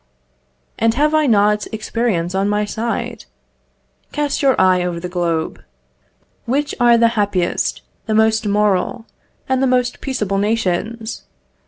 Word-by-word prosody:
And 225 Hz, 0 st, +2 dB
have 300 Hz, +3 st, +2 dB
I 310 Hz, -1 st, +3 dB
not 210 Hz, -2 st, +3 dB
experience 215 Hz, -5 st, -1 dB
on 195 Hz, +1 st, 0 dB
my 210 Hz, 0 st, +1 dB
side? 225 Hz, +2 st, -4 dB, 0.9 s
Cast 295 Hz, 0 st, -1 dB
your 270 Hz, -3 st, +3 dB
eye 185 Hz, -1 st, +4 dB
over 175 Hz, -1 st, -2 dB
the 180 Hz, -, -5 dB
globe. 170 Hz, -3 st, -2 dB, 0.8 s
Which 285 Hz, +4 st, 0 dB
are 240 Hz, -1 st, +5 dB
the 230 Hz, 0 st, +4 dB
happiest, 200 Hz, -5 st, -1 dB, 0.2 s
the 215 Hz, -, 0 dB
most 220 Hz, 0 st, +2 dB
moral, 210 Hz, +2 st, +1 dB, 0.4 s
and 260 Hz, -1 st, +1 dB
the 270 Hz, -, +3 dB
most 250 Hz, -1 st, 0 dB
peaceable 210 Hz, -8 st, -1 dB
nations? 220 Hz, +2 st, -2 dB
220 Hz, 135 wpm, -18 LUFS, 195-240 Hz, 0.9 s, are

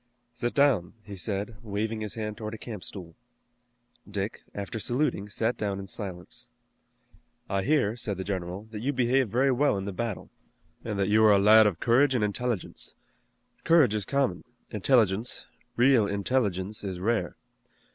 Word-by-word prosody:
"Sit 120 Hz, 0 st, -3 dB
down," 135 Hz, -, +3 dB
he 100 Hz, -2 st, -9 dB
said, 100 Hz, +3 st, -3 dB
waving 110 Hz, +1 st, -3 dB
his 105 Hz, -2 st, -3 dB
hand 105 Hz, -2 st, -4 dB
toward 110 Hz, 0 st, -6 dB
a -, -, -8 dB
camp 110 Hz, -4 st, -8 dB
stool. 90 Hz, -4 st, -9 dB, 1.0 s
Dick, 100 Hz, +1 st, -4 dB
after 100 Hz, +3 st, -5 dB
saluting, 120 Hz, -4 st, -1 dB
sat 115 Hz, +3 st, -1 dB
down 100 Hz, -2 st, -2 dB
in 100 Hz, -, -6 dB
silence. 95 Hz, -3 st, -7 dB, 1.0 s
"I 100 Hz, 0 st, 0 dB
hear," 125 Hz, -3 st, +2 dB
said 105 Hz, -5 st, -2 dB
the 95 Hz, -, -3 dB
general, 95 Hz, 0 st, -4 dB
"that 105 Hz, -, -6 dB
you 135 Hz, +6 st, -1 dB
behaved 130 Hz, -1 st, +2 dB
very 130 Hz, +6 st, +2 dB
well 130 Hz, -4 st, +2 dB
in 95 Hz, -, -4 dB
the 100 Hz, -, -4 dB
battle, 115 Hz, 0 st, -4 dB, 0.5 s
and 105 Hz, -3 st, -3 dB
that 100 Hz, 0 st, +1 dB
you 110 Hz, +1 st, +4 dB
are 105 Hz, -1 st, +7 dB
a -, -, +5 dB
lad 105 Hz, +2 st, +7 dB
of 90 Hz, -5 st, -2 dB
courage 130 Hz, +3 st, +3 dB
and 115 Hz, -, +1 dB
intelligence. 110 Hz, 0 st, -3 dB, 0.7 s
Courage 160 Hz, -10 st, +5 dB
is 105 Hz, -3 st, -1 dB
common, 140 Hz, -2 st, 0 dB, 0.3 s
intelligence, 110 Hz, 0 st, +1 dB, 0.3 s
real 120 Hz, -3 st, +4 dB
intelligence, 100 Hz, -2 st, -1 dB
is 95 Hz, -3 st, -4 dB
rare. 100 Hz, -3 st, -1 dB
105 Hz, 165 wpm, -27 LUFS, 100-120 Hz, 1.0 s, are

